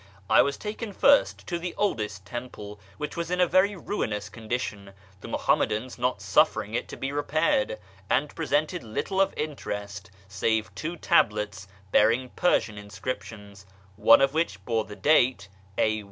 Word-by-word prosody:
I - - +8
was 140 0 0
taken 215 0 -5
first 280 +8 +3
to 175 -1 -3
the 175 0 -5
oldest 110 - -1
temple, 105 -2 -7 0.2
which 150 - -5
was 170 -1 -3
in 180 0 -1
a 180 - +6
very 185 +4 +3
ruinous 105 - -3
condition 110 -3 -5 0.3
(the - - -10
Muhammadans 120 +4 0
not 125 -5 -1
suffering 100 -1 +2
it - - -2
to - - -9
1)0 135 +1 -3
repaired), 155 - +1 0.3
and 140 +3 +1
presented 155 +3 0
little 190 - -1
of 195 - +3
interest 105 -9 -5 0.2
save 105 +2 -1
two 170 +2 -5
tablets 105 -7 +1 0.2
bearing 120 +4 +3
Persian 110 -12 +1
inscriptions, 100 -1 -7 0.3
one 110 +5 +6
of 135 0 +3
which 165 +2 -1
bore 115 -2 0
the 105 - -9
date 125 -9 +3 0.3
a. 110 0 +2
125 Hz, 155 wpm, -27 LUFS, 105-165 Hz, 0.3 s, I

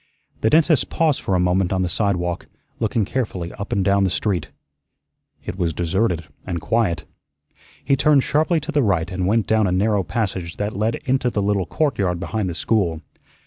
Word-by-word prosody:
The 110 - +2
dentist 155 -1 +3
paused 155 -4 +1
for 95 - 0
a - - +2
moment 90 +1 +2
on 95 -1 +1
the - - 0
sidewalk, 90 -2 -1 0.3
looking 110 -1 +1
carefully 100 -8 -3
up 100 - -7
and 100 -2 +1
down 100 0 +3
the 95 - +2
street. 90 -3 -1 1.0
It 95 - -5
was 85 -3 0
deserted 90 0 0 0.2
and 85 -2 -3
quiet. 85 -5 0 0.8
He 140 - +3
turned 140 0 +4
sharply 160 +3 +2
to 150 +3 -5
the 150 -2 +2
right 95 -6 +1
and 90 0 -1
went 110 +2 +2
down 110 -2 +2
a - - 0
narrow 100 +2 +2
passage 95 -5 -3
that 105 +1 -2
led 110 +3 0
into 130 -1 +1
the 105 -4 -1
little 100 -3 0
court 150 -7 0
yard 90 -3 0
behind 100 +1 -2
the 85 - -5
school. 85 -6 0
100 Hz, 190 wpm, -21 LUFS, 90-115 Hz, 1.0 s, turned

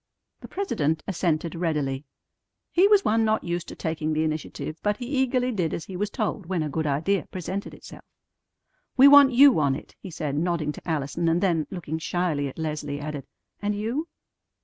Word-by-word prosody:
The - - -10
president 160 - -1
assented 170 -3 -1
readily. 150 -5 -2 0.7
He 365 +3 +5
was 410 -1 +4
one 225 +1 +3
not 220 0 +1
used 170 0 -3
to - - -8
taking 160 -1 -2
the 155 +1 +1
initiative, 155 0 -4
but 210 0 0
he 245 - -6
eagerly 255 -1 +1
did 175 -8 -1
as 160 - -6
he 190 - -8
was 205 +3 -1
told 210 -5 -3
when 180 -3 -1
a 150 - -3
good 160 +1 -1
idea 160 +8 0
presented 190 +2 -5
itself. - - -13 0.9
"We 265 +2 +9
want 280 -1 +8
you 265 - +7
on 140 -3 +2
it," - - -10
he 195 - -9
said, 155 -4 -3
nodding 165 -1 0
to 160 - -9
Allison 155 +2 -1
and 165 +1 +2
then, 170 -6 +1
looking 160 -4 -5
shyly 160 -4 -1
at 135 - -9
Leslie, 150 -2 -3
added, 145 -1 -6 0.3
"And 205 0 -1
you?" 235 +10 -2
170 Hz, 190 wpm, -25 LUFS, 155-210 Hz, 0.9 s, We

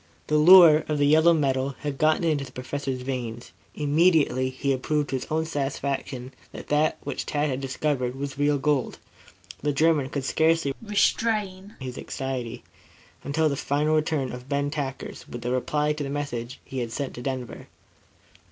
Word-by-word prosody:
The 150 0 +2
lure 165 -2 +8
of 150 - -1
the 145 - +3
yellow 160 +3 +5
metal 135 -3 0
had 145 -2 -4
gotten 155 +2 +3
into 155 -4 +1
the 130 - -10
Professor's 130 +1 -4
veins, 120 -3 -5 0.2
immediately 150 -4 +3
he 135 +2 -2
had 130 -1 -1
proved 150 +1 0
to - - 0
his 130 - -7
own 160 +1 0
satisfaction 135 -3 -3 0.2
that - - -10
that 150 +1 +2
which - - -4
Tad 150 -1 0
had 130 +1 -3
discovered 130 -1 -1
was 140 0 -5
real 145 +1 +2
gold. 140 -1 0 0.6
The 145 - +1
German 150 -1 +2
could 140 -1 -3
scarcely 160 -2 +2
restrain 205 -2 0
his 130 -2 -6
anxiety 125 -3 -5 0.6
until 155 +3 +1
the 140 - 0
final 145 +3 0
return 155 -4 0
of 125 +1 -9
Ben 140 0 0
Tackers 135 -3 -5
with 120 - -7
the 120 - -2
reply 150 +4 0
to 150 -1 -4
the 140 - -4
message 130 -4 -4
he 135 - -5
had 120 -2 -3
sent 140 +2 -3
on - - -17
to 120 - -8
Denver. 130 -2 -5
140 Hz, 180 wpm, -25 LUFS, 130-155 Hz, 0.6 s, lure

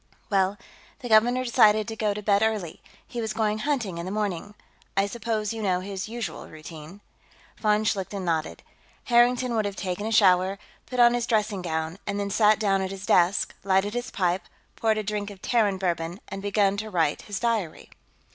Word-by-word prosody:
"Well, 195 0 +2 0.4
the 245 - -6
governor 240 +4 +4
decided 215 -3 +4
to 225 - -5
go 210 -2 0
to 210 - -6
bed 200 0 +3
early; 215 -7 -1 0.3
he 240 - -4
was 220 -1 -2
going 215 -1 0
hunting 225 - -1
in 170 - -4
the - - -4
morning. 205 -1 -3 0.4
I 195 - +4
suppose 220 -1 -2
you 225 - -5
know 185 -3 +1
his 195 +1 -5
usual 235 0 -5
routine?" 155 +4 -11 0.6
Von 210 0 +2
Schlichten 195 -2 -2
nodded. 160 -2 -2 0.4
Harrington 245 +1 +3
would 215 -2 +1
have 200 -1 -3
taken 190 +2 -3
a - - -3
shower, 190 -2 +4 0.3
put 250 0 -4
on 240 0 +7
his 240 -1 -1
dressing 210 -3 0
gown, 160 +1 -3
and 200 0 -2
then 200 0 -2
sat 215 +1 +4
down 195 -3 +1
at 190 - -2
his 195 0 -7
desk, 180 +1 +3
lighted 195 +1 +2
his 245 0 -3
pipe, 180 -2 0 0.3
poured 220 -1 +1
a 215 - -1
drink 210 0 -3
of 200 -2 -11
Terran 210 -3 +1
bourbon, 175 -1 -2
and 195 - -6
begun 200 0 +1
to 215 +1 -4
write 165 -6 +1
his 205 -2 -5
diary. 225 -9 -2
205 Hz, 195 wpm, -26 LUFS, 190-220 Hz, 0.6 s, on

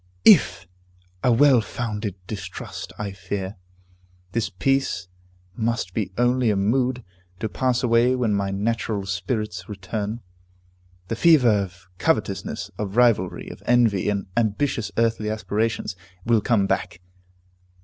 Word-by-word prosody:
"If!" 95 - +6 0.6
A 125 - +4
well 130 0 +6
founded 105 -4 -4
distrust, 105 +1 -7
I 105 -1 -4
fear. 95 +1 -5 0.7
This 115 +1 -1
peace 105 -2 0 0.5
must 115 -5 -1
be 100 -4 -2
only 120 0 +3
a 105 - +2
mood, 125 +5 +1 0.4
to 110 - -1
pass 125 +2 0
away 120 +1 +4
when 120 -4 +1
my 100 -1 0
natural 105 0 -1
spirits 95 -1 -3
return. 105 +3 -4 0.9
The 115 - -1
fever 145 -2 +5
of 95 -5 -1
covetousness, - - -1
of 105 +1 -3
rivalry, 115 -7 +3
of - - -10
envy, 115 -5 +3
and 100 -1 -1
ambitious 115 -1 0
earthly 115 -2 +1
aspirations, 110 -1 -1 0.3
will 115 -2 +3
come 105 -3 +2
back. 85 -3 -2
110 Hz, 125 wpm, -23 LUFS, 100-120 Hz, 0.9 s, If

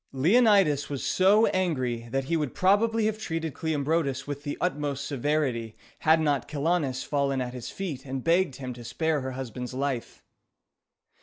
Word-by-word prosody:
Leonidas 185 - +4
was 140 -2 -4
so 205 +4 +4
angry 130 -11 -1
that 135 +3 -1
he 165 +6 -1
would 150 -5 -2
probably 210 +3 +3
have 215 0 -1
treated 165 -7 -3
Cleombrotus 145 -3 -1
with 145 -1 -5
the 145 0 -4
utmost 145 -5 -2
severity, 135 -5 -1 0.2
had 160 +1 +4
not 145 -4 0
Chilonis 145 -3 0
fallen 140 -2 0
at 125 -1 -3
his 125 -2 -6
feet 160 -9 -5
and 130 -1 -5
begged 170 -4 +2
him 130 -2 -6
to 120 0 -10
spare 155 +5 -1
her 130 0 -4
husband's 125 -1 -6
life. 135 -3 -3
145 Hz, 160 wpm, -27 LUFS, 130-170 Hz, 0.2 s, Leonidas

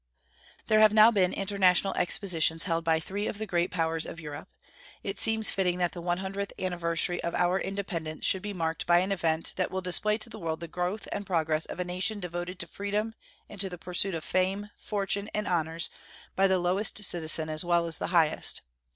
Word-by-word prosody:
There 215 - +3
have 215 0 +5
now 215 +2 +8
been 185 -4 +2
international 195 -1 +2
expositions 165 -4 +2
held 165 -2 -1
by 160 -1 +2
three 200 +5 -4
of - - -4
the 220 - -4
great 175 -2 0
powers 165 -2 -1
of 165 - -8
Europe. 150 -2 -8 0.5
It - - -3
seems 220 -1 +6
fitting 180 -2 0
that 175 -1 0
the 175 - -8
one 175 0 -1
hundredth 195 +1 -4
anniversary 175 -1 0
of 170 - -3
our 180 +2 +2
independence 180 -6 -4
should 190 - +3
be 205 +1 -4
marked 165 -4 -3
by 175 0 +5
an 185 +3 +1
event 165 -4 +1
that 185 - 0
will 190 - -3
display 210 +4 +2
to 230 +1 -3
the 220 - -8
world 160 -3 -3
the 170 - -6
growth 180 +6 -3
and 205 - -3
progress 160 -3 0
of - - -7
a 180 - -1
nation 185 +4 -1
devoted 175 0 -5
to - - -2
freedom 205 +4 -3 0.3
and 205 -2 -8
to 195 - -2
the 180 - -8
pursuit 180 +2 -1
of 160 - -5
fame, 195 +3 -1
fortune, 200 0 -2
and 210 - -2
honors 165 -1 -1 0.4
by 195 +1 +4
the 190 -1 +2
lowest 190 +4 0
citizen 160 -3 +4
as 155 +1 -2
well 175 -1 +2
as 165 -2 0
the - - -2
highest. 165 -3 +2
180 Hz, 210 wpm, -28 LUFS, 170-200 Hz, 0.5 s, now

